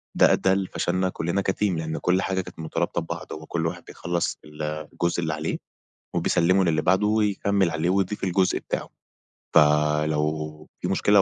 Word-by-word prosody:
ده - - +6
أدّى 95 - +2
لفشلنا 95 -1 0
كلنا 85 +3 -1
كTeam 105 - -4
لإن 80 -5 0
كل 90 +2 +2
حاجة 95 -1 0
كانت 90 - -12
مترابطة 80 - -1
ببعض، - - -6
هو 80 0 -8
كل 80 0 -2
واحد - - -5
بيخلّص 85 0 -2
الجزء 75 +3 -3
اللي 80 -1 -1
عليه 75 +1 -2 0.6
وبيسلّمه 90 +3 +3
للي 80 -2 +2
بعده 95 +3 +3
ويكمّل 100 -3 +2
عليه 80 +2 0
ويضيف 95 +2 0
الجزء 95 0 +2
بتاعه. - - -4 0.7
فلو 75 +1 +2
في - - -1
مشكلة 100 -1 +4
85 Hz, 155 wpm, -25 LUFS, 75-95 Hz, 0.7 s, ده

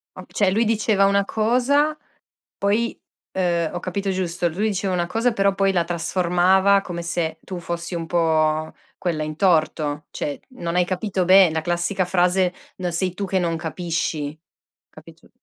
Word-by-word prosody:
O - - -9
cioè 200 -3 +1
lui 220 +4 +2
diceva 215 -2 +2
una 200 0 +3
cosa, 255 +8 +2 0.6
poi, 210 +4 0 0.3
ehm, 170 -3 0
ho 175 - -3
capito 195 +2 -3
giusto? 175 -2 -1
Lui 190 +7 -2
diceva 190 -1 -1
una 175 -1 0
cosa 230 +5 0
però 200 -2 +2
poi 195 0 +2
la 175 -3 +1
trasformava 180 +3 +2
come 175 -3 -6
se 165 -2 -2
tu 180 -2 -6
fossi 170 +1 -5
un 165 -1 -3
po' 155 -2 +1 0.3
quella 165 -4 -2
in 155 0 -5
torto, 155 -4 +1
cioè 145 - -4 0.2
non 170 -4 -3
hai 180 0 +3
capito 185 0 -1
be 185 -1 +7
la 160 - 0
classica 175 +3 -1
frase: 180 0 +2 0.3
"No 180 -1 -2
sei 180 +1 -1
tu 200 +1 -3
che 190 0 0
non 170 -2 0
capisci". 160 -2 -3 0.5
Capito? - - -16
180 Hz, 165 wpm, -22 LUFS, 170-195 Hz, 0.6 s, be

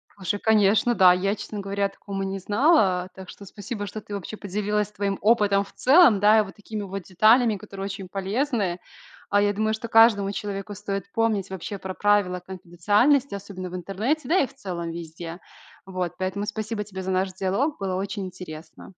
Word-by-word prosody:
Слушай, 200 +1 -3
конечно, 220 +2 +3
да. 180 -2 +7
Я, 195 +3 0
честно 210 0 -7
говоря, 200 0 -1
о - - 0
таком 195 0 -7
и - - -2
не 195 0 -4
знала. 205 - +2
Так 190 -1 -10
что 200 - -11
спасибо, 205 +1 -6
что 215 +2 -6
ты 205 - -10
вообще 200 +2 -6
поделилась 210 +1 -2
своим 200 -1 -2
опытом 205 -2 +3
в - - -16
целом, 265 - +6
да, 210 +2 +6
и 215 - +4
вот 195 - -11
такими 210 0 -6
вот 195 0 -5
деталями, 215 +5 +4
которые 195 +1 -8
очень 195 -1 -6
полезны. 200 -1 -1 0.5
А, 205 0 +3
я 205 0 +3
думаю, 215 +1 0
что 225 +1 -5
каждому 225 -3 +5
человеку 205 0 -5
стоит 200 -1 -5
помнить 220 -4 0
вообще 190 +1 -6
про 190 0 -5
правила 205 -3 +2
конфиденциальности, 205 - +1
особенно 190 -2 -7
в - - -6
интернете. 205 - -2
Да 370 - +4
и 280 - +3
в - - -19
целом 175 -10 -5
везде! 165 +1 -8 0.5
Вот. 185 -2 -3
Поэтому 190 +2 -2
спасибо 215 0 -4
тебе 190 -2 -8
за 190 - -5
наш 185 0 0
диалог, 195 - -1
было 190 -2 -2
очень 195 +1 -3
интересно. 170 -2 -10
200 Hz, 195 wpm, -24 LUFS, 190-215 Hz, 0.5 s, да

